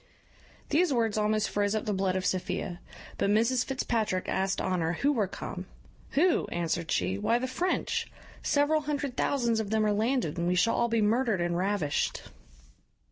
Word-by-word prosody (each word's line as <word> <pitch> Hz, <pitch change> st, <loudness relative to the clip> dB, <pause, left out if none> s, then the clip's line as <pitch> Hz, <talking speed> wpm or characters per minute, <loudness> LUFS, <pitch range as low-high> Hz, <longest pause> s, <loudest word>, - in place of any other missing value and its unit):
These 325 Hz, +2 st, +3 dB
words 230 Hz, -4 st, +1 dB
almost 215 Hz, 0 st, +1 dB
froze 205 Hz, +1 st, +1 dB
up 215 Hz, -, -2 dB
the 210 Hz, -, 0 dB
blood 190 Hz, -1 st, 0 dB
of 185 Hz, -1 st, -1 dB
Sophia; 185 Hz, -1 st, -2 dB, 0.4 s
but -, -, +2 dB
Mrs 230 Hz, +4 st, +3 dB
Fitzpatrick 225 Hz, -8 st, -1 dB
asked 190 Hz, 0 st, 0 dB
Honour 175 Hz, -3 st, 0 dB
who 280 Hz, +11 st, +1 dB
were 220 Hz, -8 st, +1 dB
come? 185 Hz, 0 st, -7 dB, 0.5 s
"Who?" 340 Hz, +5 st, +3 dB
answered 170 Hz, -1 st, -2 dB
she, 95 Hz, +2 st, 0 dB
"why, 230 Hz, -, +2 dB
the 250 Hz, -, -2 dB
French; 305 Hz, +9 st, -1 dB, 0.3 s
several 300 Hz, +2 st, +2 dB
hundred 285 Hz, -3 st, -3 dB
thousands 235 Hz, -6 st, +1 dB
of 215 Hz, -2 st, -3 dB
them 220 Hz, 0 st, +2 dB
are 210 Hz, -, +2 dB
landed, 215 Hz, -, 0 dB
and 170 Hz, -, 0 dB
we 180 Hz, -, +2 dB
shall 230 Hz, +5 st, +2 dB
be 230 Hz, -1 st, +1 dB
all -, -, +3 dB
murdered 225 Hz, -3 st, +1 dB
and 175 Hz, 0 st, 0 dB
ravished." 185 Hz, -5 st, 0 dB
215 Hz, 175 wpm, -29 LUFS, 185-250 Hz, 0.5 s, These